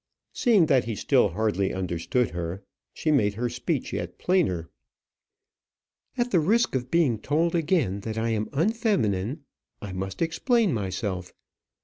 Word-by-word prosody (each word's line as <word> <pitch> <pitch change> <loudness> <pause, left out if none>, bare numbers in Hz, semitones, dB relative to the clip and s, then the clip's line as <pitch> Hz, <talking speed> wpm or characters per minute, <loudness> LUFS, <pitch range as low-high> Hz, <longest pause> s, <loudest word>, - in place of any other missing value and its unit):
Seeing 220 - +4
that 130 -6 +3
he 115 -2 -3
still 125 -1 +3
hardly 100 0 0
understood 95 +6 -1
her, 85 +3 -5 0.3
she 155 - -1
made 105 -8 +2
her 120 +3 -1
speech 125 +4 -3
yet - - -4
plainer. 140 - +1 1.5
"At 245 0 0
the 180 - +4
risk 225 +9 +2
of 125 -1 -2
being 145 -10 +2
told 160 +8 +1
again 160 - +1
that 110 +2 -5
I 115 +1 0
am 110 -1 -1
unfeminine, 145 - 0 0.4
I 105 -5 -7
must 95 - -3
explain 220 - +1
myself. 95 -3 -3
120 Hz, 140 wpm, -26 LUFS, 100-165 Hz, 1.5 s, Seeing